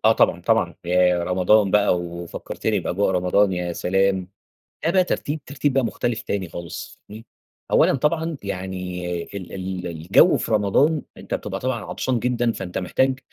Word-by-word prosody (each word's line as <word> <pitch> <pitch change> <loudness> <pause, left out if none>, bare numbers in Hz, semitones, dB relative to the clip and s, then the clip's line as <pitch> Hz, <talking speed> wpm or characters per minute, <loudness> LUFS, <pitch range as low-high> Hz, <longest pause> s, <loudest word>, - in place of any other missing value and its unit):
آه، - - +7
طبعًا، - - +2
طبعًا، - - +1
ياه! 90 0 +3
رمضان 95 +3 +3
بقى 100 -2 +3
ووفكرتِني 85 +4 -3
بأجواء 95 +3 0
رمضان 95 +2 +2
يا 90 -1 -2
سلام! 95 +1 +1 0.6
ده 165 - +3
بقى 185 0 +4
ترتيب 155 -3 -2
ترتيب 140 0 -1
بقى 135 -2 +2
مختلف 115 +1 -2
تاني 95 -3 -3
خالص 85 -1 -8
فاهمني، 110 +2 -10 0.5
أولًا - - +5
طبعًا 160 +3 0
يعني 90 -2 -4 0.2
ال 95 -1 -8
ال 95 -1 -4
الجو 85 +2 +4
في - - -4
رمضان 110 +9 +3 0.2
أنت - - -7
بتبقى - - -3
طبعًا 125 -3 -2
عطشان 125 -2 -1
جدًا، 120 0 +1
فأنت 95 -5 -5
محتاج 130 +8 +1
100 Hz, 160 wpm, -23 LUFS, 90-120 Hz, 0.6 s, آه